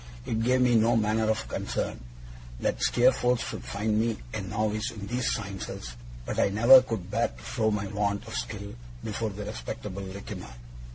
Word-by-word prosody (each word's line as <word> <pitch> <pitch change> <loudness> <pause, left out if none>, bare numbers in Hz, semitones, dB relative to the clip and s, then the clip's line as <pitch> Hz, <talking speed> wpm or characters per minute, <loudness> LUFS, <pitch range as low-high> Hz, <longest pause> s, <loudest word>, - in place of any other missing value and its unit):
It 110 0 -1
gave 125 +2 +3
me 125 -1 +4
no 115 +1 +4
manner 110 0 +2
of 110 - 0
concern - - -3 0.6
that - - -1
Steerforth 125 0 +4
should - - -5
find 105 +1 0
me 115 -1 0 0.2
a - - -2
novice 110 +2 -1
in 105 -4 -7
these 120 +3 0
sciences, 95 - -5 0.3
but - - -2
I - - +4
never 115 +6 +8
could 115 -8 -4
bear - - +2
to - - -15
show 110 -1 0
my 105 -1 -1
want 100 +1 -1
of 110 - -6
skill 100 -1 -4 0.3
before 110 +1 -2
the 105 0 -6
respectable 80 +3 -5
Littimer. 95 -10 -7
110 Hz, 175 wpm, -28 LUFS, 100-115 Hz, 0.6 s, never